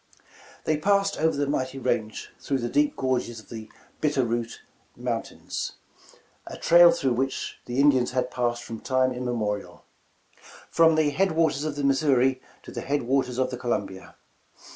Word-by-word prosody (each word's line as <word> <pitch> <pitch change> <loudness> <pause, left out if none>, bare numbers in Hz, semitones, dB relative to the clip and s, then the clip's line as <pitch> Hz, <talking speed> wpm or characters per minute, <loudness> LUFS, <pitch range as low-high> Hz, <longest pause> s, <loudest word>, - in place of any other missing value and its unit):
They 155 - +1
passed 200 +4 +1
over 160 -1 +2
the 145 - +1
mighty 135 -2 -2
range 110 -4 -2
through 135 - -1
the 120 -2 -3
deep 145 +3 +2
gorges 125 -3 -1
of 110 - -17
the 110 -2 -8 0.3
Bitterroot 120 -6 -1 0.4
Mountains, - - -4 0.7
a - - -7
trail 175 0 +7
through 140 -7 +1
which 135 +2 -3
the 125 +2 -2
Indians 135 -4 +4
had 125 0 -1
passed 120 -1 -1
from 115 -1 -7
time 130 -1 +1
immemorial, 115 -5 -3 0.9
from 165 -1 +5
the 155 -2 +2
head 190 +4 +1
waters 155 -3 +1
of 155 -2 -3
the 145 - -3
Missouri 135 -2 +3 0.2
to - - -10
the - - -5
head 145 -1 -1
wa 135 +3 +2
tei*s 125 -1 -6
of 130 - 0
the 125 - -4
Columbia. 100 -6 -4
130 Hz, 165 wpm, -26 LUFS, 120-145 Hz, 0.9 s, trail